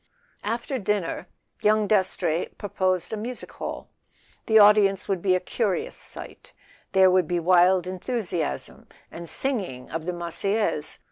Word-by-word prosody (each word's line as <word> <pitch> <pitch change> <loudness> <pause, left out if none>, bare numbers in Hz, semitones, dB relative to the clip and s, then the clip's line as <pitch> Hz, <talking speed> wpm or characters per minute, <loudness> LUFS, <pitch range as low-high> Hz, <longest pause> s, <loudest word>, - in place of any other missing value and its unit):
After 235 +5 -2
dinner 200 -4 -2 0.3
young 215 0 +3
Dastrey 185 -5 +1
proposed 185 -2 -1
a - - +1
music 235 +3 -6
hall. - - -6 0.6
The 220 - +5
audience 205 -2 +5
would 190 -3 -1
be 185 -1 +3
a - - +2
curious 195 +1 -2
sight: - - -10 0.4
there 190 -1 +6
would 185 -3 +3
be 175 +1 0
wild 180 +1 +4
enthusiasm, 185 - -3 0.2
and 170 -1 -4
singing 185 - -2
of 165 +1 -4
the 180 - -1
Marseillaise. 175 0 -1
190 Hz, 135 wpm, -25 LUFS, 175-210 Hz, 0.6 s, there